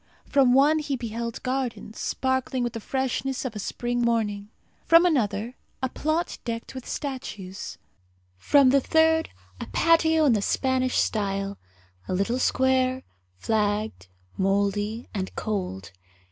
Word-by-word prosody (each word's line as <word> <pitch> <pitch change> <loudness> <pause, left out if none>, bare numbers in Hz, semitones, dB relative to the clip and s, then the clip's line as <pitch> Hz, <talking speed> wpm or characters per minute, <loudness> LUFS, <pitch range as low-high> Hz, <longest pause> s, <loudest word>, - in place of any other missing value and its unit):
From 265 -3 +4
one 295 +4 +5
he 290 -2 -2
beheld 235 -1 -5
gardens, 255 -4 -3
sparkling 260 -1 -1
with 240 -1 -2
the 230 - -4
freshness 265 +2 -2
of 240 -4 -4
a - - -4
spring 240 +4 -2
morning; 210 -3 0 0.3
from 335 +1 +6
another 230 - 0 0.3
a 260 - +1
plot 315 +6 -2
decked 230 -1 -5
with 260 -1 -8
statues; 210 -9 -5 0.6
from 265 - +4
a 280 - +6
third, 320 +3 +3 0.3
a - - -6
patio 320 -1 +3
in 265 - +5
the 210 - +1
Spanish 255 +3 +1
style, 200 -2 -1 0.5
a 185 - -1
little 215 +7 0
square, 260 0 +2 0.3
flagged, 210 - -1 0.3
mouldy, 200 +3 0
and 190 -3 -4
cold. 180 - -3
245 Hz, 130 wpm, -26 LUFS, 210-265 Hz, 0.6 s, from